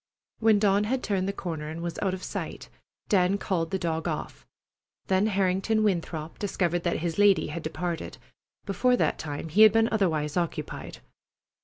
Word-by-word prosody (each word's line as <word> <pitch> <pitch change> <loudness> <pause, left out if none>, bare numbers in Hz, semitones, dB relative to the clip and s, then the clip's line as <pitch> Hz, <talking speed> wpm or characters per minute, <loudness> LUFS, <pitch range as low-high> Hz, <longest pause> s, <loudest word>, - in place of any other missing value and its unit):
When 220 -2 +5
Dawn 200 0 +3
had 255 +4 -1
turned 195 -3 0
the - - 0
corner 160 -6 -5
and 160 +1 -6
was 170 -1 -4
out 190 -2 0
of 185 - -10
sight, - - -5 0.4
Dan 190 0 +3
called 170 -5 -1
the 190 - -1
dog 165 -2 -2
off. - - -5 0.6
Then 190 +2 +2
Harrington 195 +2 +1
Winthrop 165 -5 -2
discovered 175 -4 0
that 170 -2 -1
his 170 +2 -2
lady 205 -2 +4
had 170 - -5
departed. 165 +2 -4 0.5
Before 245 +6 +2
that - - +1
time 150 +1 -5
he 190 +8 +3
had 215 -1 +9
been 225 +1 +3
otherwise 160 -8 0
occupied. 170 -2 -4
185 Hz, 170 wpm, -27 LUFS, 165-205 Hz, 0.6 s, had